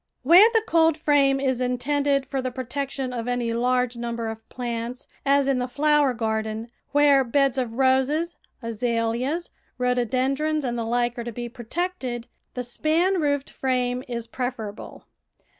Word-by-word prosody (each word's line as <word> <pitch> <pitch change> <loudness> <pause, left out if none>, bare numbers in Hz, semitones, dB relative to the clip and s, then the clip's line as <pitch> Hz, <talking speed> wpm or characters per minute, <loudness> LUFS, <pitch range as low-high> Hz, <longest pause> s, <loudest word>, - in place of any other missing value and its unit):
Where 355 - +8
the 450 -2 +2
coldframe 300 -4 +3
is 260 -2 0
intended 275 +2 +1
for 270 0 -3
the 255 - -2
pro 255 +1 -6
tection 265 0 -3
of 235 0 -4
any 245 -2 -1
large 250 +1 +1
number 235 -1 -3
of 220 0 -9
plants, 240 0 -5 0.2
as 280 0 +4
in 270 -2 +2
the 250 - 0
THE - - -6
VEGETABLE 245 - -21 0.2
GARDEN 295 - +6
flower 275 -3 +3
garden, 220 0 -2 0.2
where 285 -2 +5
beds 270 +2 +2
of 240 -3 -2
roses, 265 +6 +2 0.3
azaleas, 235 +7 -1 0.3
rho 250 0 +2
dodendrons, 270 +5 0
and 240 -2 -2
the 230 -1 -2
hke 240 +1 0
are - - -3
to 235 - -5
be 240 +1 -5
protected, 250 0 -4 0.3
the 250 - -2
span 330 +9 +1
roofed 285 -2 0
frame 250 -1 -1
is 235 -2 -4
preferable. 230 -3 -6
255 Hz, 165 wpm, -24 LUFS, 240-280 Hz, 0.3 s, Where